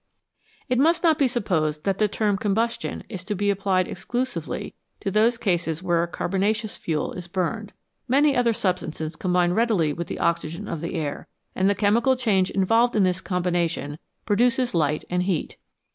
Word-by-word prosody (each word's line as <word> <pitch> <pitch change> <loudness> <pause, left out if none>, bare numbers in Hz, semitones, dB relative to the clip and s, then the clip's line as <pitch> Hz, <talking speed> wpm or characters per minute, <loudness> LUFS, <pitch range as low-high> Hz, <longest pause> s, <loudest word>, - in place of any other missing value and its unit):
It 250 -1 +1
must 330 +5 +3
not 320 -2 +4
be 275 - +4
supposed 160 - -1
that 195 -1 -1
the 215 - +4
term 205 0 0
combustion 220 +3 -1
is 190 -5 -7
to 210 +1 -2
be 205 +1 +1
applied 190 -2 +1
exclusively 245 +8 -4 0.3
to 195 - -3
those 225 +4 +3
cases 170 -5 -1
where 175 -2 +2
a 170 - -1
carbon 185 +2 -2
aceous 215 +1 0
fuel 155 -3 -2
is 180 -1 -7
burned. 190 +4 -2 0.4
Many 280 +2 +4
other 245 -2 +3
substances 170 -6 -2
combine 180 0 +1
readily 200 -9 +2
with 170 +3 -5
the - - -5
oxygen 170 +3 -1
of 165 -5 -4
the 170 +3 -4
air, 150 -3 -4 0.3
and 190 +1 +2
the 200 - +2
chemical 225 +6 +3
change 205 -7 +2
involved 225 +5 +2
in 210 - +4
this 185 0 +1
combination 175 -5 -1 0.3
produces 240 +4 +2
light 150 -3 0
and 180 0 0
heat. 180 -3 -2
195 Hz, 175 wpm, -24 LUFS, 175-225 Hz, 0.4 s, not